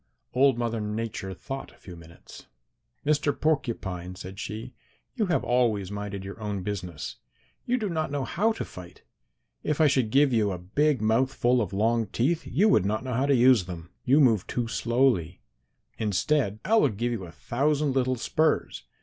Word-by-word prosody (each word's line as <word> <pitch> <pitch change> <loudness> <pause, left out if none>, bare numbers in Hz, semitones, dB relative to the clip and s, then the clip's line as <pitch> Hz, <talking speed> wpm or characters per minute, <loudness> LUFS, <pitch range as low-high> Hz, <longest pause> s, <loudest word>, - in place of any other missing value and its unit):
"Old 135 -1 +4
Mother 115 -2 -1
Nature 105 -2 -4
thought 135 +7 -7
a - - -22
few 90 - -11
minutes. 85 0 -14 0.6
'Mr. 150 -1 +1
Porcupine,' 95 - -1
said 95 +1 -9
she, 110 +4 -6 0.4
'you 220 -5 0
have 170 - +1
always 115 -6 +1
minded 100 -1 -5
your 100 +3 -8
own 100 -3 -3
business. 90 -6 -5 0.5
You 250 +1 +2
do 220 -4 -2
not 160 -4 -1
know 140 -1 -2
how 220 +6 +1
to - - -5
fight. 90 -1 -12 0.6
If 150 -1 -1
I 160 - +6
should 130 -6 +2
give 140 +2 +4
you 105 -3 +2
a 90 - -3
big 125 - 0
mouth 115 +5 +2
full 125 -1 +2
of 100 -5 -3
long 110 +3 +1
teeth 150 - 0
you 205 +5 +3
would 155 - +4
not 105 +4 -1
know 130 -1 -3
how 130 +4 +1
to 140 - +4
use 125 -5 +5
them. 85 -1 -8
You 135 +4 +4
move 115 -9 +4
too 120 -2 -2
slowly. 115 -8 +1 0.6
Instead, 110 - 0
I 225 +4 +4
will - - +4
give 115 +4 -2
you 110 -6 -4
a 85 - -11
thousand 145 - 0
little 130 -1 +1
spurs. 155 +6 0
115 Hz, 185 wpm, -27 LUFS, 100-140 Hz, 0.6 s, I